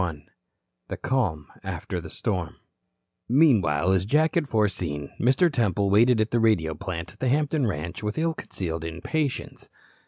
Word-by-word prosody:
CHAPTER 80 -5 -3 0.6
XXXI - - -6
CALM 95 - 0 0.2
AFTER 90 - -4
THE 80 - -9
STORM 90 -4 -3 0.7
Meanwhile, 100 - +4
as 95 0 +1
Jack 155 +6 +3
had 165 -6 0
foreseen, 90 -9 -1
Mr. 135 +7 +3
Temple 100 -5 +1
waited 115 +3 +5
at 110 +1 +1
the 120 - +2
radio 90 -9 +2
plant 85 0 -6
at 105 - -24
the 130 - 0
Hampton 145 -1 +1
ranch 85 -2 -4
with 105 0 -3
ill 165 +1 +1
concealed 80 - -5
impatience. 130 - -3
105 Hz, 155 wpm, -25 LUFS, 85-130 Hz, 0.7 s, waited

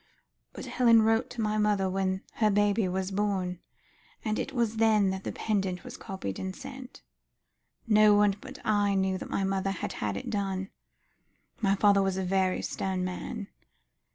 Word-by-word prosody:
But - - -7
Helen 230 -3 +4
wrote 225 +2 +2
to 245 - -5
my 215 0 0
mother 205 -2 +2
when 190 0 -1
her 215 -2 +3
baby 205 0 +2
was 185 +1 -2
born, 190 -3 -1 0.7
and 215 -1 0
it - - -3
was 230 -3 0
then 215 -3 +4
that 190 0 -5
the - - -3
pendant 195 -5 -2
was - - -8
copied 190 - -6
and 190 0 -4
sent. 265 -1 -10 0.8
No 215 -1 +6
one 205 -1 +4
but - - -9
I 205 -2 +2
knew 190 -1 +1
that - - -7
my 195 - -1
mother 195 0 0
had 195 - -3
had 100 -2 -3
it - - -5
done; 195 -2 -2 0.9
my 195 -2 +3
father 200 0 +4
was 195 -1 0
a 190 - -1
very 185 0 +1
stern 185 -1 -2
man. 200 +4 -5
195 Hz, 175 wpm, -29 LUFS, 190-215 Hz, 0.9 s, No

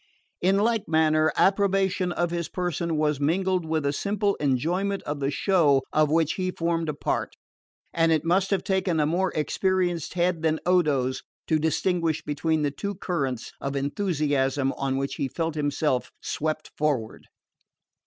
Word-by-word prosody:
In 190 +2 +3
like 220 0 +1
manner, 155 -1 +3
approbation 195 -2 +2
of 175 -1 -1
his 170 -1 -3
person 170 -2 -2
was 150 -2 +1
mingled 180 +3 +1
with 160 -2 -1
a 140 - +1
simple 200 +4 0
enjoyment 175 +9 0
of 145 0 -4
the 135 0 0
show 145 -4 +3
of 155 -1 +3
which 160 0 +2
he 185 -1 -2
formed 165 -2 -1
a 150 - -2
part; - - -2 0.6
and 165 0 +3
it 160 -1 +1
must 185 +3 +2
have 195 -3 0
taken 190 -4 0
a 150 - +3
more 180 +5 +1
experienced 175 +1 0
head 175 -2 +1
than 160 -1 +1
Odo's 145 -8 +2 0.2
to 155 - +1
distinguish 165 0 0
between 155 +1 0
the 145 - +1
two 200 +8 -4
currents 135 - -3
of 140 0 -3
enthusiasm 140 -3 0
on 135 -1 -2
which 135 0 -3
he 135 - -1
felt 165 +4 -2
himself 145 -3 0
swept 155 0 -3
forward. 140 -8 -2
160 Hz, 160 wpm, -26 LUFS, 145-180 Hz, 0.6 s, In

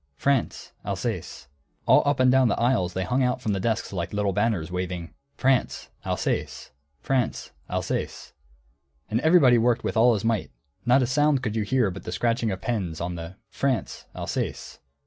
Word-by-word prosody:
France: 140 - 0
Alsace. 100 - -4 0.4
All - - +6
up 145 -2 +2
and 130 0 +5
down 130 -1 +5
the 110 - 0
aisles 115 -7 +1
they 95 - 0
hung 125 +8 0
out 125 0 +1
from 110 -5 -1
the 95 - -1
desks 110 +1 -1
like 85 -2 -3
little 105 -1 0
banners, 105 -5 0
waving: 90 -2 -4 0.2
France: 130 -1 +1
Alsace. - - -2 0.3
France: 130 -4 -1 0.2
Alsace. - - -3 0.8
And 110 - +2
everybody 145 -7 +6
worked 120 +1 +2
with - - -2
all 115 +1 +5
his 105 - -3
might, 115 -3 0 0.4
not 130 +2 +5
a - - +2
sound 140 +1 +2
could 110 -3 -2
you 110 - +1
hear 115 -1 +1
but 95 - -8
the - - -6
scratching 115 +5 0
of 95 -2 -4
pens 95 -9 -2
on 85 +1 -3
the 85 +1 -7 0.2
"France: 135 -4 -2
Alsace." - - -4
115 Hz, 175 wpm, -25 LUFS, 95-125 Hz, 0.8 s, All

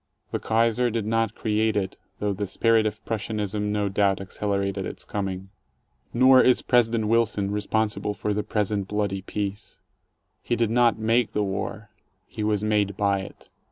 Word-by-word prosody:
The - - -1
Kaiser 115 +2 +2
did 115 -2 -2
not 115 0 0
create 110 0 0
it, 95 -2 -1 0.2
though 105 -1 -1
the 100 +1 -3
spirit 110 +2 +3
of 105 0 -6
Prussianism 105 -1 -2
no 105 -1 0
doubt 100 0 +1
accelerated 100 0 -2
its - - -7
coming. 95 -2 -4 0.6
Nor 130 +1 +6
is 125 - +3
President 115 -3 +2
Wilson 105 -3 +1
responsible 105 0 -1
for 105 - -2
the 105 - 0
present 105 -2 -1
bloody 100 -2 -1
peace. 100 +1 -5 0.6
He 120 - -1
did 115 -2 0
not 120 -1 +3
make 115 +1 +1
the 105 - +1
war: 100 +2 -4 0.3
he 110 - -6
was 105 -1 0
made 105 -2 +1
by 100 -1 +2
it. 95 - -11
105 Hz, 160 wpm, -25 LUFS, 100-110 Hz, 0.6 s, Nor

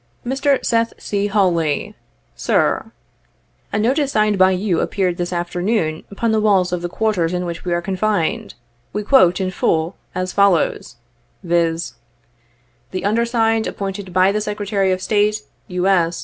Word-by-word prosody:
"Mr. 270 +2 +1
SETII 230 -1 +1
C. 205 0 -2
HAWLEY, 175 -7 +1 0.4
"Sir: - - 0 0.8
"A - - -1
notice 270 +6 +1
signed 215 -1 +2
by 185 -1 +5
you 185 -2 0
appeared 185 -3 -1
this 175 0 -3
afternoon, 175 -1 -1
upon 225 +3 -1
the 220 - +2
walls 190 -4 +2
of 180 - -1
the 175 - -3
quarters 180 -4 0
in 180 0 -2
which 170 -1 -5
we 180 - -2
are 175 0 0
confined. 200 - -1 0.4
We 210 - -2
quote 205 -7 +4
it, - - 0
in 185 - -2
full, 165 -1 0 0.2
as 185 0 -2
follows, 200 - +2 0.5
viz: 170 -1 0 0.5
' 120 +1 -40
The 185 0 -3
undersigned 225 0 +1
appointed 195 -1 -5
by 185 +2 +4
the 210 +1 -1
Secretary 205 -2 -1
of 185 0 -2
State, 210 +1 +1 0.2
U. 180 -2 -2
S. 175 -3 +2
190 Hz, 160 wpm, -19 LUFS, 175-215 Hz, 0.8 s, by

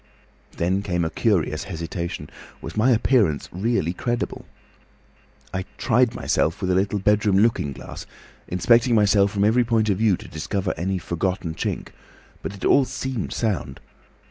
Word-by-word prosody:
"Then 95 +3 +1
came 90 -4 -1
a 80 - -2
curious 85 -8 0
hesitation. 85 -3 -5 0.3
Was - - -8
my 110 +4 +3
appearance 110 - +2
really 95 -3 0
credible? 120 +5 -3 1.1
I 95 0 -2
tried 120 0 +2
myself 80 - 0
with 95 -2 -1
a - - +3
little 100 +3 +1
bedroom 105 0 +2
looking 105 -9 +2
glass, 65 - -9 0.4
inspecting 115 +6 +3
myself 100 -1 +4
from 100 -1 0
every 115 +4 +4
point 110 -2 +1
of 95 - -1
view 110 -5 +3
to - - -11
discover 95 +5 -2
any 95 +3 -1
forgotten 90 0 -2
chink, - - -3 0.5
but 100 - -5
it 100 - -6
all 140 - +5
seemed 130 -5 -4
sound. 100 - -2
100 Hz, 150 wpm, -23 LUFS, 85-115 Hz, 1.1 s, all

